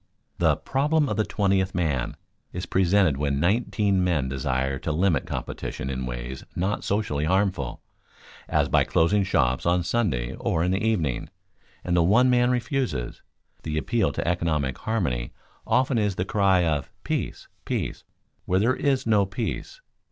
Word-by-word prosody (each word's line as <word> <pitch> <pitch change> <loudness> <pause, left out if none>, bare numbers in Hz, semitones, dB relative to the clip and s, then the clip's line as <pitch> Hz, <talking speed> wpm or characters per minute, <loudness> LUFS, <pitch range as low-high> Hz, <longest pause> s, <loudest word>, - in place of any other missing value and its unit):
The - - +4
"problem 150 +3 +1
of 105 - -2
the 110 - +3
twentieth 95 -3 0
man" 75 -8 -1 0.4
is 90 +1 -4
presented 95 -5 +3
when 70 -1 0
nineteen 100 +1 +1
men 80 -7 +1
desire 65 0 -1
to 80 - -3
limit 80 -2 +1
competition 65 - -4
in 65 -1 -3
ways - - -6
not 95 +4 -1
socially 95 -8 -1
harmful, 95 -6 0 0.7
as - - +2
by - - +3
closing 100 +5 +2
shops 65 -9 +1
on 90 0 +2
Sunday 75 - 0
or 80 - -1
in 90 - +1
the 95 +2 0
evening, 85 - 0 0.5
and 90 - 0
the 85 - +4
one 115 +9 +4
man 125 0 +3
refuses. 125 - -2 0.4
The 75 -1 -3
appeal 110 +6 +1
to - - -3
economic 80 -6 0
harmony 75 - -2 0.3
often 130 -2 +2
is 105 -3 0
the 90 - -1
cry 95 -3 +3
of 75 -4 -1
"peace, - - -3 0.2
peace, - - -3 0.4
where 90 - +1
there 120 +6 +2
is 140 -3 0
no 105 -3 +3
peace." 115 - -4
90 Hz, 155 wpm, -25 LUFS, 70-105 Hz, 0.7 s, The